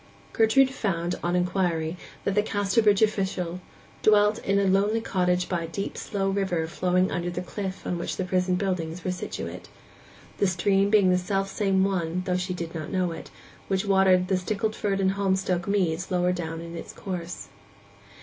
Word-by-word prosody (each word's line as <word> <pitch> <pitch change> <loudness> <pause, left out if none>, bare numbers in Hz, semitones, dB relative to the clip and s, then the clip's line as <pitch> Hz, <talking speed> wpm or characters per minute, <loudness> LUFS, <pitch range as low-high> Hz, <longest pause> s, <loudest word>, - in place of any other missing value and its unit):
Gertrude 260 +4 +4
found, 180 -8 -1
on 175 +1 0
inquiry, 180 -3 0 0.3
that 200 - 0
the 210 - +3
Casterbridge 205 0 +2
official 190 -4 -1 0.4
dwelt 210 0 +4
in 200 0 0
a 200 - +3
lonely 200 +4 +3
cottage 180 -4 0
by 175 -2 -1
a - - -7
deep 195 +4 -4
slow 195 -2 -2
river 190 -4 0
flowing 180 +2 +1
under 175 0 -2
the 175 0 -4
cliff 190 0 -5
on 175 - -2
which - - -3
the - - -1
prison 180 0 +1
buildings 180 -3 -2
were 185 - -1
situate—the 185 +2 -6
stream 195 +2 +2
being 200 -3 +5
the 180 - +3
self 195 +2 -1
same 195 -2 +2
one, 180 -2 -1
though 180 -1 0
she 180 0 -2
did 170 -2 -5
not 160 0 -5
know 185 -2 0
it, 165 - -8 0.4
which 195 +1 0
watered 190 -2 +4
the 190 - +2
Stickleford 210 +1 -1
and 190 -1 +3
Holmstoke 190 -2 0
meads 180 -3 0
lower 180 -1 +2
down 165 -2 -4
in 170 0 -8
its - - -8
course. 180 -3 -6
185 Hz, 175 wpm, -26 LUFS, 180-200 Hz, 0.4 s, being